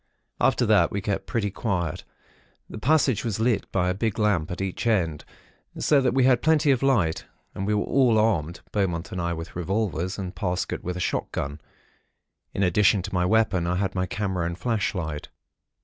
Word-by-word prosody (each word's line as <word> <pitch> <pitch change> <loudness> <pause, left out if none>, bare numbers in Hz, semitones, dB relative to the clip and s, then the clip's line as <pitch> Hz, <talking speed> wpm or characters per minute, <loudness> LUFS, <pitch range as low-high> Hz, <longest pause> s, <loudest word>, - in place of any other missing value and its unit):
"After - - +3
that, - - +4
we 100 - -3
kept 100 0 -3
pretty 105 -4 -1
quiet. 90 -7 -2 0.6
The - - -8
passage 140 -4 +2
was 110 -4 -2
lit 110 -3 0
by 90 -2 +1
a 90 - +1
big 110 +2 -2
lamp 105 -8 +1
at 90 - -5
each 95 +4 -3
end; 85 -9 +1 0.5
so 145 -2 +3
that 130 -1 +1
we 135 - +4
had 125 -1 +4
plenty 155 -2 +3
of 130 - +1
light; 115 -13 +1 0.3
and 95 - -4
we 105 - +2
were 105 - +1
all 125 -5 +3
armed. 90 -7 +1
Beaumont 90 -4 -1
and 90 - -3
I 85 0 -1
with 80 0 -7
revolvers, 95 0 -2
and 95 -2 -5
Parsket 90 -3 -2
with 90 0 -3
a - - -4
shotgun. 70 -4 -3 0.9
In 100 - -1
addition 95 +1 +3
to 100 0 -6
my 90 -1 +1
weapon, 105 -5 +2
I 90 - 0
had 95 0 -1
my 95 -1 -1
camera 95 -5 -2
and 85 0 -5
flashlight. 90 -10 -2
95 Hz, 190 wpm, -25 LUFS, 90-110 Hz, 0.9 s, that